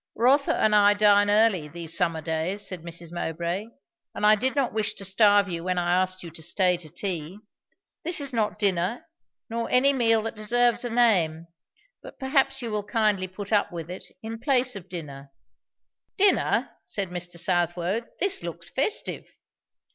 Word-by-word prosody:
"Rotha 270 +5 +3
and 215 -1 +2
I 205 0 +5
dine 205 -1 +4
early, 205 -7 +3
these 165 +1 -4
summer 165 -3 +1
days," 165 +6 -3
said 185 -3 -6
Mrs. 170 0 -8
Mowbray; 175 +4 -3 0.5
"and - - -1
I 210 - +7
did 260 +6 -1
not 275 -4 0
wish 215 -1 -1
to 195 - -7
starve 205 +1 +4
you 170 -2 -4
when 185 0 -1
I 175 0 +1
asked 185 0 -3
you 170 - -9
to 160 - -10
stay 180 +2 +1
to 165 -3 -12
tea. 175 0 -4 0.7
This 345 +1 +2
is 280 -2 -2
not 220 -3 -1
dinner, 195 - 0 0.4
nor 230 0 -3
any 275 +3 +4
meal 225 -4 +3
that 225 - -5
deserves 240 +3 +1
a 245 - -3
name 185 -9 +2 0.6
but - - -12
perhaps 270 -1 0
you 230 - -4
will 210 -1 -1
kindly 210 -3 0
put 200 +3 -7
up 205 - +2
with 170 -1 -7
it, 185 - -8 0.2
in 225 0 -6
place 255 -1 +2
of 190 -2 -9
dinner." 140 -6 -8 0.9
"Dinner!" 395 0 +2 0.2
said 195 -3 -3
Mr. 175 -1 -5
Southwode. 175 +5 0
"This 390 -1 +2
looks 170 0 -6
festive!" 280 - -2
200 Hz, 175 wpm, -25 LUFS, 175-230 Hz, 0.9 s, I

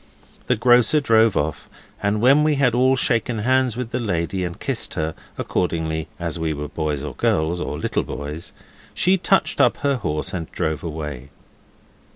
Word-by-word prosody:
The 125 - +3
grocer 125 +6 +4
drove 115 -6 +3
off, 75 0 -2 0.3
and 105 +1 0
when 135 +5 +6
we 155 -1 +2
had 135 -4 +2
all 130 +2 +4
shaken 115 -2 0
hands 130 +2 +1
with 125 -2 -4
the 125 - -1
lady 95 -3 -1
and 85 -1 -5
kissed - - -1
her, 80 0 -2 0.2
according 80 -3 -2
as 85 -1 -3
we 80 -1 -1
were 75 0 -5
boys 75 -3 -2
or 75 - -5
girls, 80 +3 0
or 75 - -3
little 80 - -1
boys, 75 +3 -6 0.4
she 185 +2 +3
touched 190 +1 +2
up - - +4
her 140 -2 +2
horse 85 -3 -2
and 85 -3 -5
drove 80 -2 -2
away. 75 -5 -6
90 Hz, 175 wpm, -22 LUFS, 80-125 Hz, 0.4 s, when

